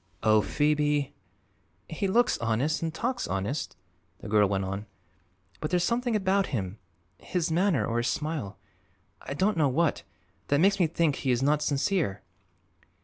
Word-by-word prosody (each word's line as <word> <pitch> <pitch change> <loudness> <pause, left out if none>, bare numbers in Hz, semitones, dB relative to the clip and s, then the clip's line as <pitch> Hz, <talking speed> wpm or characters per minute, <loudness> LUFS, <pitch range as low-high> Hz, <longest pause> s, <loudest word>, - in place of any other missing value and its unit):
"Oh, 110 -1 +5
Phoebe!" 150 +1 +1 0.7
"He 180 +5 -2
looks 240 +6 +2
honest, 115 +7 0
and 165 -1 -1
talks 245 +9 -2
honest," 100 +10 -3 0.4
the - - -10
girl 105 -1 +3
went 95 -1 -1
on, 100 +2 -5 0.7
"but 150 - -3
there's 180 -1 +1
something 240 +1 0
about 195 -1 +2
him 100 -4 -4 0.4
his 175 -3 -2
manner 170 - +2
or 115 - -2
his 120 +1 0
smile; 150 -10 -3 0.6
I 135 - -6
don't 195 +6 +1
know 150 -3 +3
what 160 +4 +1 0.5
that 145 - +2
makes 195 +3 +3
me 175 - +4
think 160 -2 +1
he 135 - -2
is 125 +1 +2
not 150 +2 +2
sincere." 140 - 0
150 Hz, 155 wpm, -28 LUFS, 115-180 Hz, 0.7 s, Oh